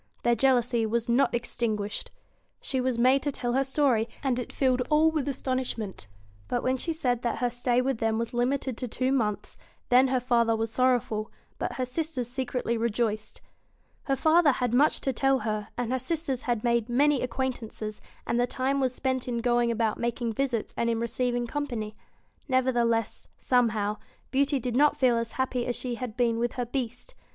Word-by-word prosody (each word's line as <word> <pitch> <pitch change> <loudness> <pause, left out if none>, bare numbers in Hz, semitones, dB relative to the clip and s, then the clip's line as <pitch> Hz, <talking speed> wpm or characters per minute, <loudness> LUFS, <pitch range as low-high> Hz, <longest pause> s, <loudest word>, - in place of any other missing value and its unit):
Their 240 - +4
jealousy 245 -1 +2
was 230 +1 -1
not 240 +3 +3
extinguished. 220 -3 -2 0.5
She 260 -2 -1
was 255 -2 0
made 255 +3 +4
to 290 - -1
tell 245 -3 -2
her 270 +2 +3
story, 265 -5 +2 0.2
and 255 -3 +1
it 245 - -5
filled 255 -2 +1
all 310 +1 +4
with 305 -3 -1
astonishment. 255 - -3 0.4
But 245 - -1
when 260 +1 +1
she 330 - -2
said 250 -7 0
that 240 - -1
her 245 -1 0
stay 245 0 +1
with 265 -3 -1
them 225 -1 +1
was 230 +1 -3
limited 255 0 0
to 250 - -3
two 255 +3 -1
months, 215 -6 -1 0.3
then 255 +2 +6
/her 260 -1 +1
father 235 -2 +2
was 225 0 -2
sorrowful, 240 -4 +1 0.3
but - - -2
her 255 - -2
sisters 260 -1 -2
secretly 250 -1 -2
v - - -4
rejoiced. 215 -2 -1 0.6
Her 275 - +1
father 315 +1 +4
had 245 -2 -1
much 285 +5 +3
to 270 - 0
tell 270 +2 +3
her, 215 -4 -3
and 245 -1 -2
her 260 - +1
sisters 295 -3 -2
had 235 -3 0
made 235 -1 +1
many 280 +3 +3
acquaintances, 230 -4 -4 0.2
and 235 - 0
the 245 - +2
time 265 +2 0
was 255 -2 0
spent 260 -2 -1
in 240 -1 -1
going 240 0 +2
about 225 -2 0
making 235 -1 -1
visits 245 -2 -1
and 235 - 0
in 230 - +1
receiv 240 +2 -1
ing 240 0 -1
company. 235 -6 -4 0.5
Nevertheless, 240 -4 +1
somehow, 215 -4 +1 0.3
Beauty 280 +1 +2
did 245 -1 -3
not 295 +3 +4
feel 250 -3 +4
as 230 -1 -3
happy 255 -2 -1
as 245 - -1
she 250 -2 -4
had 240 -1 -5
been 230 -2 +2
with 240 0 0
her 245 - -2
Beast. 245 - -4
245 Hz, 190 wpm, -27 LUFS, 235-260 Hz, 0.6 s, then